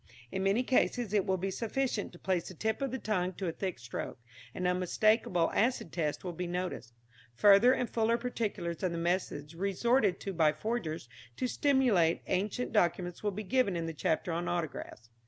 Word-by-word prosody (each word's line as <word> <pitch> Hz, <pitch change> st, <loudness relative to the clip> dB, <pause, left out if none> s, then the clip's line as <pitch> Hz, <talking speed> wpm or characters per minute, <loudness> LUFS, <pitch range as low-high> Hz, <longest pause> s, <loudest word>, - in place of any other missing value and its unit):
In 190 Hz, -, -2 dB
many 200 Hz, +6 st, +2 dB
cases 245 Hz, -4 st, +1 dB
it 205 Hz, -3 st, +2 dB
will 190 Hz, 0 st, +2 dB
be 190 Hz, +2 st, -2 dB
sufficient 230 Hz, +1 st, -2 dB
to 175 Hz, -, -13 dB
place 180 Hz, -1 st, -1 dB
the 185 Hz, -, -9 dB
tip 220 Hz, -, -1 dB
of 275 Hz, -, 0 dB
the 260 Hz, -, -3 dB
tongue 185 Hz, -6 st, -1 dB
to 190 Hz, -, -5 dB
a -, -, 0 dB
thick 185 Hz, 0 st, -4 dB
stroke. 115 Hz, -1 st, -6 dB, 0.4 s
An 180 Hz, -, -2 dB
unmistakable 180 Hz, 0 st, +2 dB
acid 235 Hz, -6 st, +1 dB
taste 155 Hz, -4 st, -2 dB
will 180 Hz, -2 st, -4 dB
be 180 Hz, +2 st, -4 dB
noticed. 175 Hz, -9 st, -4 dB, 0.4 s
Further 205 Hz, -, +7 dB
and 250 Hz, -2 st, +1 dB
fuller 230 Hz, 0 st, +1 dB
particulars 215 Hz, -8 st, -3 dB
of 185 Hz, -2 st, 0 dB
the -, -, -3 dB
methods 165 Hz, -3 st, -1 dB
resorted 200 Hz, +3 st, +1 dB
to 195 Hz, -, -4 dB
by 160 Hz, -3 st, +3 dB
forgers 165 Hz, -, -3 dB, 0.3 s
to -, -, -1 dB
simulate 245 Hz, -, +2 dB
ancient 210 Hz, +7 st, -1 dB
documents 175 Hz, -3 st, +1 dB
will 210 Hz, -, 0 dB
be 205 Hz, +2 st, -5 dB
given 235 Hz, -3 st, +1 dB
in 165 Hz, -1 st, -2 dB
the 165 Hz, -, -4 dB
chapter 160 Hz, +3 st, 0 dB
on 170 Hz, +1 st, -2 dB
Autographs. 155 Hz, -8 st, -4 dB
190 Hz, 190 wpm, -31 LUFS, 170-220 Hz, 0.4 s, Further